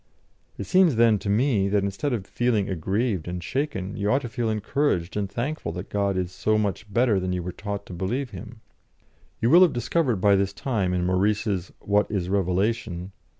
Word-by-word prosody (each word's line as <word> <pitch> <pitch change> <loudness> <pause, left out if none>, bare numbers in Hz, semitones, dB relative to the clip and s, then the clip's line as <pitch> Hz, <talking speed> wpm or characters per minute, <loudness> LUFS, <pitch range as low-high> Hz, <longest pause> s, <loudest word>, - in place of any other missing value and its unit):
It - - -4
seems 185 -7 +4
then, 115 -2 +4
to 100 - -4
me, 105 -2 +2
that 100 0 +2
instead 100 +9 -2
of 110 -6 -2
feeling 115 -3 0
aggrieved 95 +1 -1
and 90 0 -4
shaken, 105 - -3
you 100 0 -1
ought 135 +5 +2
to 120 - -4
feel 115 -1 -2
encouraged 105 - 0
and 100 -2 -1
thankful 120 - -3
that 90 +2 -7
God 100 -2 0
is 90 -1 -2
so 110 +3 +1
much 105 0 -2
better 115 -2 +3
than 90 0 -2
you 90 -1 -2
were 90 - -4
taught 100 +1 -5
to - - -9
believe 120 +10 -2
Him. 120 -3 -10 0.8
You 115 - +3
will 175 - +8
have 175 -6 +6
discovered 120 +2 0
by 100 +1 +5
this 100 0 0
time 100 -6 -1
in 90 -1 0
Maurice's 95 0 0
'What 105 0 +1
is 95 -4 -2
Revelation?' 95 0 -1
100 Hz, 195 wpm, -25 LUFS, 95-120 Hz, 0.8 s, will